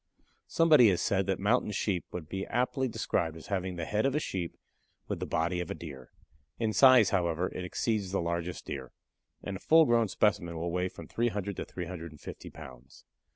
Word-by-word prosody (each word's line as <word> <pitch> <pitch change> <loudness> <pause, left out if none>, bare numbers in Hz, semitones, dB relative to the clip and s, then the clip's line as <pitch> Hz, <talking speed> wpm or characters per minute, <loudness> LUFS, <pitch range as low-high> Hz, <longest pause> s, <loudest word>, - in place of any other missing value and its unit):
Somebody 150 -9 +6
has 90 - +1
said 95 -1 +1
that 95 - +1
Mountain 105 +1 +1
Sheep 95 -3 -1
would 85 -4 -6
be 95 +3 -4
aptly 130 +2 0
described 80 -8 -1
as 80 - -11
having 95 -1 -2
the 85 -2 -4
head 105 +4 0
of 135 - -1
a - - +3
sheep 90 - -4 0.5
with - - -3
the - - -4
body 85 +2 0
of 90 - -4
a - - -3
deer. 70 -6 -9 0.5
In 110 -2 0
size, 130 -6 +7
however, 90 -2 0
it 90 - -5
exceeds 100 +2 -1
the 100 - 0
largest 85 +1 -3
deer, 65 -2 -6 0.5
and 95 - -4
a - - -15
full 160 +6 +6
grown 115 -3 +3
specimen 95 -4 +1
will 85 +1 -2
weigh 90 +1 0
from - - -11
300 105 -4 -1
to - - -3
350 85 -4 -8
pounds. 65 +1 -13
95 Hz, 195 wpm, -30 LUFS, 85-110 Hz, 0.5 s, size